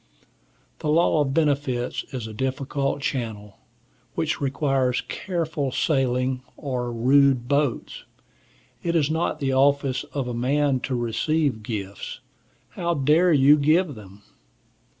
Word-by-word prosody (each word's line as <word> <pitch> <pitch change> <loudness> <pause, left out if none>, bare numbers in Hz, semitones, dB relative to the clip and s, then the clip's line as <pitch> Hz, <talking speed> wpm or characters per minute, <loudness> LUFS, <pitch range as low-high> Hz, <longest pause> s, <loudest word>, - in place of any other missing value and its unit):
The 150 - -3
law 160 0 +3
of 135 -2 0
benefits 140 -5 0
is 125 -5 -5
a 110 - -7
difficult 135 +3 -2
channel, 110 -7 -4 0.6
which - - -1
requires 135 -2 +1
careful 160 -7 -3
sailing, 130 -2 0 0.2
or 125 -4 -3
rude 130 +1 +3
boats. 140 -2 -1 0.8
It 170 0 -1
is 155 -2 +2
not 160 -1 -1
the 135 -2 0
office 135 -1 +2
of 135 -3 -4
a 125 - -3
man 135 +3 +1
to 130 - 0
receive 125 +2 0
gifts. 100 -3 -6 0.5
How 170 -1 -2
dare 155 +6 +3
you 145 0 +6
give 155 +3 +2
them? 100 -2 -13
135 Hz, 125 wpm, -24 LUFS, 125-150 Hz, 0.8 s, you